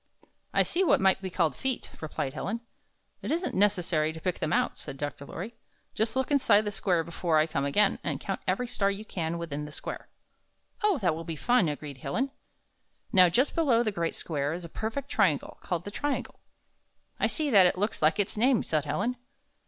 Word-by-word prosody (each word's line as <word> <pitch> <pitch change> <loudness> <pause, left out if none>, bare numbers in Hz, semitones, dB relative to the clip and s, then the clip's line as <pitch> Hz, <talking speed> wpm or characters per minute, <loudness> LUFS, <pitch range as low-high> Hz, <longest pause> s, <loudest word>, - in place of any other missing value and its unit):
"I - - +4
see 370 - +1
what 360 - +4
might 190 0 +3
be 190 - -4
called 165 -5 +1
feet," 265 -2 -2
replied 145 -3 -3
Helen. 220 +9 -3 0.6
"It - - -5
isn't 340 +3 -1
necessary 180 -6 +2
to 160 - -8
pick 180 +2 -2
them 155 - -1
out," - - +1
said 135 - -7
Dr. 145 0 -5
Lorry. 205 +7 -6 0.4
"Just 220 +2 0
look 265 +2 0
inside 260 -7 +5
the 210 -1 -3
square 180 -4 +1
be 170 - -10
fore 165 -1 +1
I 155 - +5
come 140 -3 -2
again, 195 +8 +3
and - - -2
count - - -4
every 250 - +1
star 210 -5 0
you 200 +2 -4
can 165 -5 -3
see - - -3
within 150 -3 -4
the 150 - -9
square." - - -6 0.7
"Oh, 420 -5 +3
that 175 -3 +3
will 165 +1 -5
be 165 -1 -5
fun!" 225 0 +3
agreed 145 -2 -6
Helen. 265 - -2 0.8
"Xow, 180 -2 +7
just 255 - +2
below 260 -8 +3
the 215 - 0
Great 170 -4 -2
Square 145 -2 -2
is 175 +1 -6
a - - -9
perfect 225 - -4
triangle, 155 -7 +1
called 175 -1 -3
the 205 - -5
Triangle." 290 +6 -3 0.8
"I - - +3
see 305 -3 0
that, 195 -5 +8
and - - +5
it - - -4
looks 205 +3 -1
like 155 +6 +3
its 200 - 0
name," 240 +2 +3
said 155 -2 -1
Helen. 220 +12 -1
185 Hz, 215 wpm, -28 LUFS, 160-230 Hz, 0.8 s, that